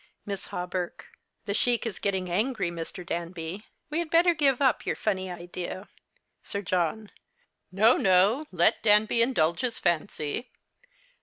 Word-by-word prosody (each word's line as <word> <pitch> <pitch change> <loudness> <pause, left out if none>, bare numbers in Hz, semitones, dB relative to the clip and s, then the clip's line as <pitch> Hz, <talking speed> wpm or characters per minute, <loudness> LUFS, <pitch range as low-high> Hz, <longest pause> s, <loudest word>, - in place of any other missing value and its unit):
Miss 200 -2 -5
Hawberk. 180 0 -5 0.3
The 200 - -2
Sheik 240 +3 +1
is 225 - -4
getting 190 -2 -1
angry, 200 0 0
Mr. 170 +1 -7
Danby. 170 +3 -5 0.2
We 310 - 0
had 340 -2 -2
better 340 +2 +5
give 280 -5 +2
up 265 -5 +2
your - - -1
funny 190 -1 -2
idea. 175 +2 -7 0.5
Sir 200 0 -4
John. 185 +4 -1 0.6
No, 215 +6 +4
no, 195 +10 +3
let 175 -1 +3
Danby 215 +2 +4
indulge 170 -9 +2
his 245 -3 -1
fancy. 170 - -1
195 Hz, 140 wpm, -27 LUFS, 175-235 Hz, 0.6 s, better